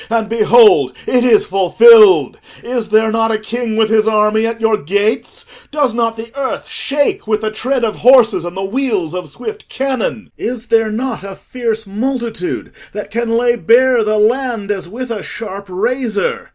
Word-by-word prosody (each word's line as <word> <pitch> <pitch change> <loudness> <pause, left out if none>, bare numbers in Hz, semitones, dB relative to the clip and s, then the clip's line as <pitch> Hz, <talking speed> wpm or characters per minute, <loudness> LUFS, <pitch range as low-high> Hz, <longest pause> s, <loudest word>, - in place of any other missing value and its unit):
And 225 -1 0
behold, 215 - +4
it 250 -1 +1
is 235 -4 +4
fulfilled! 400 - +5 0.2
Is 240 -3 -3
there 220 +1 +2
not 225 0 +1
a 220 - 0
king 225 +1 -4
with 220 -1 +1
his 220 -1 +2
army 215 +1 +2
at 230 0 -5
your 225 -1 +1
gates? 220 - -3
Does 285 -5 0
not 230 -1 -1
the 225 +1 -8
earth 275 -2 -4
shake 285 -5 -2
with 215 -1 0
the 215 -1 -2
tread 250 +4 -2
of 220 -2 -1
horses 235 -7 +4
and 175 +2 -7
the 190 - -3
wheels 205 - -2
of 180 0 -6
swift 430 -1 -8
cannon? 260 -4 -3
Is 240 0 -5
there 225 -1 +2
not 235 +1 -4
a 195 -1 -8
fierce 225 -2 -4
multitude 230 -1 -4 0.2
that 210 0 -7
can 230 +1 -1
lay 240 0 +2
bare 240 +1 +3
the 215 0 0
land 225 -1 0
as 190 -4 -5
with 245 +4 -7
a 215 -3 -4
sharp 200 -2 -8
razor? 250 - -2
225 Hz, 180 wpm, -15 LUFS, 215-250 Hz, 0.2 s, fulfilled